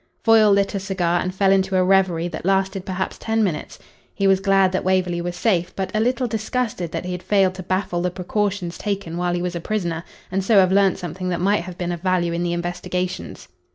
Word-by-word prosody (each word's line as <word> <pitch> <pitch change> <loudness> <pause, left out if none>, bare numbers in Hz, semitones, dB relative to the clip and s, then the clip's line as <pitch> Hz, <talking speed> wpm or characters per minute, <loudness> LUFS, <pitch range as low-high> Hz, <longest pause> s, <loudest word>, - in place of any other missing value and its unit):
Foyle 220 -2 +6
lit 200 0 +2
a 200 - -1
cigar 180 -3 0
and 185 - -2
fell 190 +1 +2
into 190 0 +2
a 185 - +4
reverie 185 -3 +2
that 170 - -6
lasted 195 0 0
perhaps 190 0 -3
ten 225 0 0
minutes. 175 -7 -3 0.4
He 200 - 0
was 195 -1 +4
glad 195 -1 +3
that 185 - -1
Waverley 180 -2 +1
was 175 0 -4
safe, 180 -4 0
but 190 -1 -3
a - - +2
little 250 +3 +1
disgusted 220 -5 -2
that - - -4
he 180 - -4
had 180 0 -4
failed 190 0 +2
to 190 - -7
baffle 185 -1 -1
the 180 - 0
precautions 190 0 -2
taken 200 -5 -3
while 175 0 0
he 175 - -2
was 180 -1 -3
a 170 - -3
prisoner, 170 -5 -2 0.3
and 190 +1 0
so 220 +3 +2
have 185 -1 +5
learnt 195 -1 +3
something 180 +1 -5
that 175 - -1
might 200 +2 +2
have 180 -1 -8
been 175 -1 -2
of 170 -2 -5
value 180 -2 +1
in 170 - -2
the 175 0 -1
investigations. 180 +1 -4
185 Hz, 230 wpm, -22 LUFS, 175-195 Hz, 0.4 s, Foyle